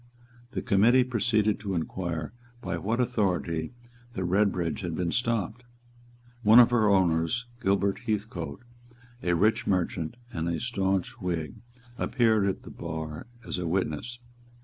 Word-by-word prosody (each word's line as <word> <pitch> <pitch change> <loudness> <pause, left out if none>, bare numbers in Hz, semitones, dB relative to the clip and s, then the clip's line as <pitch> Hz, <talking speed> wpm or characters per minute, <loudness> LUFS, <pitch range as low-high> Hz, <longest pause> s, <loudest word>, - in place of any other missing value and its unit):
The - - -3
Committee 115 +6 +5
proceeded 110 -3 +1
to 100 -3 -3
inquire 85 -2 -3 0.3
by 90 -6 -3
what 110 +8 -1
authority 90 - 0 0.4
the 95 - -3
Redbridge 90 -2 +1
had 85 -4 -3
been 85 0 -1
stopped. 115 -1 -1 0.8
One 110 0 +7
of 120 -1 +8
her 110 -3 +4
owners, 95 +5 +2 0.2
Gilbert 100 +1 +1
Heathcote, 100 -7 -3 0.6
a 90 -1 +1
rich 110 +7 +2
merchant 90 -1 0 0.2
and 80 +1 -2
a 85 -1 -1
stanch 95 -2 -1
Whig, 85 -6 -3 0.4
appeared 110 -5 +2
at 95 - -2
the - - -10
bar 80 0 -6 0.2
as - - -3
a 90 - -2
witness. 95 +6 -2
95 Hz, 135 wpm, -28 LUFS, 85-110 Hz, 0.8 s, of